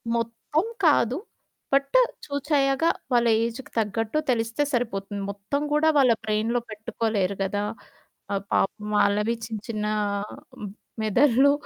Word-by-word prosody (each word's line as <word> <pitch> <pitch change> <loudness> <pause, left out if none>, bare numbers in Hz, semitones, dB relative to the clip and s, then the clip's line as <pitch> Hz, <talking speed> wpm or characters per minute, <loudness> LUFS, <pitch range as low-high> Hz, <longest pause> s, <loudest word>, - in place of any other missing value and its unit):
మొత్తం 230 - -1 0.2
కాదు. 260 -3 +4 0.6
బట్ 275 - +3 0.3
చూచయ్యాక 285 0 +1 0.3
వాళ్ళ 240 -1 +4 0.2
ఏజుకి 235 +3 -5
తగ్గట్టు 225 +4 -1
తెలిస్తే 230 +3 0
సరిపోతుంది. 205 -4 -2
మొత్తం 200 +8 -3
కూడా 300 +1 +3
వాళ్ళ 260 -4 +6
బ్రెయిన్‌లో 220 +3 0
పెట్టుకోలేరు 215 -3 -1
కదా! 205 +1 -1 0.7
ఆహ్, 195 -1 -1
పాపం 210 +2 0
వాళ్ళవి 210 +3 +2
చిన్న, 220 -2 -5
చిన్న 215 -2 -2 1.2
మెదడ్లు 255 +5 +4
230 Hz, 110 wpm, -25 LUFS, 210-270 Hz, 1.2 s, వాళ్ళ